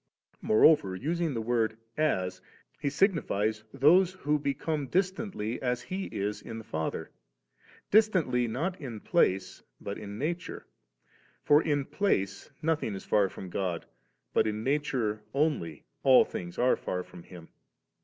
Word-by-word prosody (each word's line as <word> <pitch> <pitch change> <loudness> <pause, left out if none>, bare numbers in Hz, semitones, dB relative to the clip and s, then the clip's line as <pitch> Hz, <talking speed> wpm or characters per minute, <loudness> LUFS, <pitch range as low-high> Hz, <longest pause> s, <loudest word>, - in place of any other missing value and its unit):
* - - -65
Moreover, 110 -4 +5
using 160 - -1
the 115 - -2
word 110 -2 0 0.2
' - - -47 0.2
as,' 90 0 -5 0.4
He 150 - -2
signi 190 +4 +3
fies 105 +1 -1
those 170 +7 +5
who 150 -5 0
become 145 +1 -2
distantly 185 - -1
as 125 -2 -1
He 190 +8 -4
is 105 +1 -3
in 115 - -7
the 110 - -7
Father; 80 -6 -4 0.8
distantly 175 - +3
not 165 +11 -3
in 120 -6 -6
place 95 - +1 0.2
but 100 - -5
in 100 -1 -7
nature; 165 +7 -4 0.8
for 150 +1 +5
in 145 -4 0
place 100 - -1
nothing 155 -10 0
is 95 - -8
far 100 -2 +3
from 95 -1 -9
God 90 -4 -2
9, - - -27 0.4
but - - +3
in 105 0 -2
nature 130 -6 0
only 140 - 0 0.2
all 130 -2 +7
tilings 85 -1 -7
are 125 +1 +4
far 90 0 -3
from 90 - -13
Him. 85 -1 -13
125 Hz, 155 wpm, -29 LUFS, 100-155 Hz, 0.8 s, all